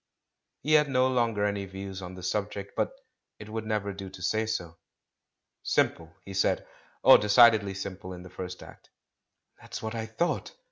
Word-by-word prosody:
He 155 +3 +2
had 150 -1 +5
no 130 -1 +3
longer 115 -5 +1
any 100 -1 -1
views 95 0 -7
on 90 0 -7
the 90 - -10
subject, 100 +1 -3
but - - 0 0.5
it 105 - -10
would 110 0 -4
never 105 -2 -1
do 95 0 -7
to 90 - -12
say 110 +5 +1
so. 85 -6 -3 0.8
"Simple," 85 0 0
he 100 - -8
said. 95 - +1 0.4
"Oh, - - +10
decidedly 105 -1 +5
simple 95 -1 -6
in 90 -1 -8
the 90 - -12
first 90 -1 -7
act." - - -15 0.7
"That's - - -7
what 110 +1 -3
I 110 -1 -3
thought!" 170 - -2
100 Hz, 175 wpm, -28 LUFS, 95-110 Hz, 0.8 s, Oh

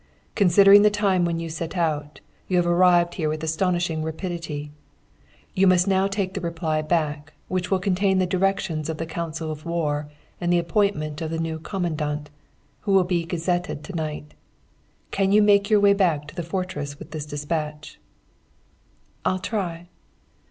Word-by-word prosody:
'Considering 200 +1 +7
the 210 - +6
time 200 -4 +1
when 170 -1 -1
you 165 - -4
set 165 +2 -5
out, 150 -3 -2 0.3
you 185 - +1
have 175 - +3
arrived 175 0 +4
here 155 -4 -1
with 155 +1 -3
astonishing 175 0 0
rapidity. 160 -2 -5 0.8
You 190 +1 +3
must 180 0 +4
now 190 0 +3
take 195 -1 -2
the 195 - -4
reply 165 -2 -1
back, 150 -2 -1 0.2
which 185 -1 -2
will 190 - +3
contain 190 +1 +1
the 185 - +3
directions 185 -4 -1
of 160 - -3
the 165 - -3
Council 160 -1 -4
of 155 0 -7
War 150 -3 -2 0.3
and 175 0 0
the 175 - +4
appointment 170 -3 0
of 160 - -2
the 165 - -3
new 160 -1 -3
Commandant, 155 -5 -3 0.5
who 200 - -1
will 190 -1 +6
be 175 -2 -1
gazetted 175 -2 -2
to 170 - -8
night. 150 -2 -4 0.8
Can 195 -1 +1
you 210 +1 +6
make 200 -1 +4
your 215 -1 +5
way 200 0 +5
back 170 -7 +1
to - - -14
the - - -3
fortress 165 -5 -4
with - - -11
this 155 -2 -5
despatch?' 150 +1 -4 1.2
"'I'll 185 - +1
try.' 180 -4 -4
170 Hz, 170 wpm, -24 LUFS, 155-190 Hz, 1.2 s, Considering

